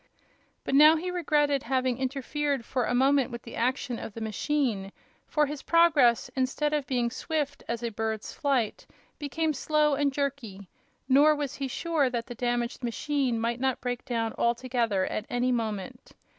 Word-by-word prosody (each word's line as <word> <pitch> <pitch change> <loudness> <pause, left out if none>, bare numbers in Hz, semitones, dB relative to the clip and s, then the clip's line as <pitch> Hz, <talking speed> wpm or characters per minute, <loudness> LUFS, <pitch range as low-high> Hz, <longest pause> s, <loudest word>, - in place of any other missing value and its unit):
But - - -3
now 305 +3 +8
he 360 +3 -3
regretted 295 -5 +1
having 255 -1 0
interfered 275 0 -2
for 250 -1 -1
a 245 - 0
moment 270 +1 +3
with 235 -2 -7
the 230 - -9
action 250 0 -1
of 210 - -8
the - - -5
machine, 220 -2 -1 0.4
for 300 -1 +2
his 290 -1 -6
progress, 300 -9 +4
instead 275 +3 0
of 290 -3 -1
being 245 -2 0
swift 295 0 -3
as 235 0 -3
a 235 - -2
bird's 220 0 -3
flight, 265 -6 -1 0.3
became 310 +2 -1
slow 300 +1 +2
and 280 0 +1
jerky, 260 -9 -4 0.4
nor 290 +3 +5
was 290 -3 -3
he 275 - -2
sure 300 0 0
that 235 -2 -3
the 245 - -7
damaged 240 +1 -2
machine 255 0 -1
might 235 +1 -1
not 265 -1 0
break 245 -1 -3
down 230 -2 -2
altogether 235 -5 +1
at 215 - -4
any 245 +1 +1
moment. 215 -5 -4
260 Hz, 170 wpm, -28 LUFS, 235-290 Hz, 0.4 s, now